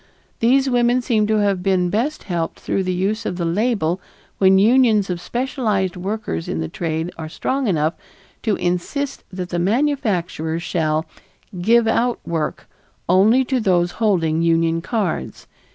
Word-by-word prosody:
These 265 +4 +3
women 245 0 +2
seem 220 -4 +1
to 215 - +2
have 200 -3 +1
been 180 -2 +1
best 250 +9 -1
helped 170 -3 -3
through 195 - -1
the 185 - 0
use 200 +5 -1
of 180 - -3
the 170 - -1
label 190 -1 0 0.4
when 190 0 +5
unions 220 -2 +4
of 175 -1 -4
specialized 220 -6 -1
workers 190 - -4
in 80 - -2
the 80 - -2
trade 160 - -3
are 160 -1 -5
strong 265 - -2
enough 160 -4 +1 0.5
to 215 -3 +1
insist 180 +11 -2
that 185 -1 -5
the 175 - -2
manufacturers 185 - 0
shall 155 -2 0 0.6
"give 230 +4 +4
out 240 +2 +1
work" 160 -2 -3 0.4
only 215 +9 +4
to 260 0 0
those 175 -5 +2
holding 165 -7 +2
union 165 0 +2
cards. 190 - -3
190 Hz, 150 wpm, -20 LUFS, 170-230 Hz, 0.6 s, when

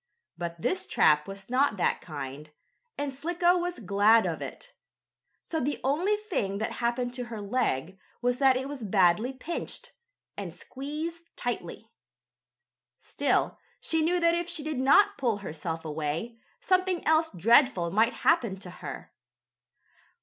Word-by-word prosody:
But 170 0 -5
this 370 - -1
trap 150 -1 +4
was 195 0 -8
not 255 -3 +2
that 180 - +1
kind, 145 -1 -7 0.5
and 285 -1 -2
Slicko 345 +5 +2
was 350 0 -3
glad 210 +2 +4
of - - -2
it. - - -8 0.7
So 320 - -3
the 285 +2 -1
only 335 +10 +2
thing 350 - -2
that 220 - -2
happened 245 +1 0
to 250 -1 -4
her 230 -2 -7
leg 195 - -1 0.2
was 245 0 0
that 265 -2 +5
it 265 +1 -3
was 280 -2 -6
badly 195 +3 +3
pinched, 340 - -5 0.4
and - - -5
squeezed 310 +5 -6
tightly. - - -5 1.1
Still - - 0 0.2
she 320 -1 +1
knew 350 +3 +2
that 335 0 +4
if 345 0 -1
she 310 - -5
did 305 -3 -3
not 405 +10 +5
pull 235 -6 +1
herself 165 -3 -5
away, 160 +9 -3 0.2
something 370 -1 +1
else 320 +1 +3
dreadful 195 - +4
might 225 +5 +3
happen 235 - +3
to 185 -1 -10
her. - - -8
250 Hz, 145 wpm, -28 LUFS, 195-320 Hz, 1.1 s, that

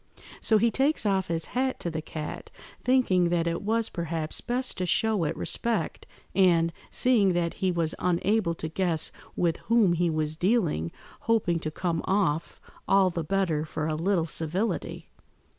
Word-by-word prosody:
So 220 - +3
he 230 +2 +3
takes 275 0 +2
off 195 -2 +1
his 165 -1 0
hat 260 +1 0
to 170 - -2
the 160 0 -3
cat, 155 -1 -7 0.3
thinking 195 -9 +3
that 170 -1 +1
it 170 0 -1
was, 225 +2 0
perhaps, 165 -2 -3
best 250 +1 -1
to 180 - -1
show 215 -2 +2
it 150 - -2
respect, 235 -1 -1 0.3
and, 170 -3 +3 0.2
seeing 220 -7 +3
that 170 -1 0
he 190 -1 +2
was 170 -2 0
unable 180 0 +1
to 160 - -4
guess 165 -1 0 0.2
with 170 -2 +1
whom 225 -6 +4
he 170 0 +1
was 155 -1 -1
dealing, 175 - +1 0.4
hoping 185 -7 +2
to 155 - -3
come 165 +1 -2
off 175 -5 0 0.3
all 195 -1 +4
the 170 -1 -3
better 175 -3 0
for 155 0 -4
a 155 - -1
little 170 +2 +1
civility. 165 +7 -2
175 Hz, 165 wpm, -27 LUFS, 165-210 Hz, 0.4 s, whom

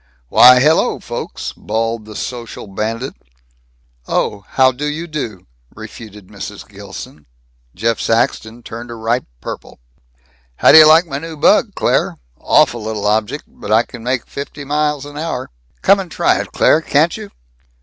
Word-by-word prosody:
"Why, 125 - +8
hello 155 +5 +2
folks," - - -6
bawled 115 0 -3
the 110 0 -11
social 120 0 -6
bandit. 110 +6 -4 0.9
"Oh. 100 -1 -1
How 130 -1 +3
do 140 +4 -4
you 155 +3 -3
do," 130 - -6 0.3
refuted 105 -3 -11
Mrs. - - -9
Gilson. 75 -3 -11 0.5
Jeff 115 +3 0
Saxton 115 0 -1
turned 115 +2 -8
a 120 - -7
ripe 115 +2 -1
purple. - - -8 0.8
"How - - +5
do 160 - +10
you 155 - +9
like 160 +3 +6
my 140 -4 -4
new 165 0 -8
bug, - - +3
Claire? - - 0 0.2
Awful 120 -2 +2
little 110 -1 -4
object. 110 +7 0
But 105 - -9
I 110 +2 +5
can 120 -1 -11
make 125 0 -1
fifty 140 +1 -7
an 140 - -11
hour. 150 -1 -2 0.3
Come 195 +1 +5
and 190 -2 -5
try - - +1
it, - - -5
Claire, - - +3
can't - - +2
you?" - - -8
120 Hz, 155 wpm, -17 LUFS, 110-150 Hz, 0.9 s, do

